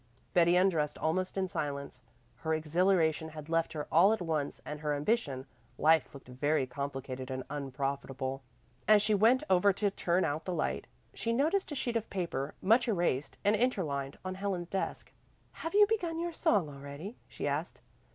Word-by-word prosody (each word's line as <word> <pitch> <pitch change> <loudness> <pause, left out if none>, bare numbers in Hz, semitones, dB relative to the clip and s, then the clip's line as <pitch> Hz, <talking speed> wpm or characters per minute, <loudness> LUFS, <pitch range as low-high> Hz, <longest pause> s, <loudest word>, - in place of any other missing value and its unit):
Betty 175 0 +5
undressed 175 -5 +2
almost 185 +5 -1
in 190 -1 +1
silence. 140 -6 -4 0.4
Her 160 0 0
exhilaration 160 0 +2
had 155 0 -9
left 165 0 +1
her 150 -2 -3
all 180 +6 +6
at 220 - -1
once 155 -4 -2
and 150 0 -5
her 150 -1 -1
ambition; 145 - 0 0.3
life 160 +1 +4
looked 140 -3 -12
very 135 +3 +1
complicated 130 -1 -5
and 130 0 -3
unprofitable. 135 -1 -3 0.5
As 210 -1 +6
she 215 - +2
went 225 +6 +4
over 190 +2 +5
to 200 +1 0
turn 180 -1 +1
out 155 +1 -2
the 180 - -2
light, - - -1 0.3
she 230 - -2
noticed 315 +10 +1
a - - -3
sheet 240 -3 -2
of 225 -1 -1
paper, 165 -7 -3
much 230 +5 +4
erased 170 - 0
and 205 +1 +5
interlined, 155 - -1
on 185 - -2
Helen's 185 -3 -3
desk. 195 - -3 0.4
"Have 330 +4 -5
you 415 0 +8
begun 360 -7 -1
your 340 0 -2
song 205 - +2
already?" 140 - -8
she - - -4
asked. - - -2
165 Hz, 170 wpm, -31 LUFS, 145-205 Hz, 0.5 s, you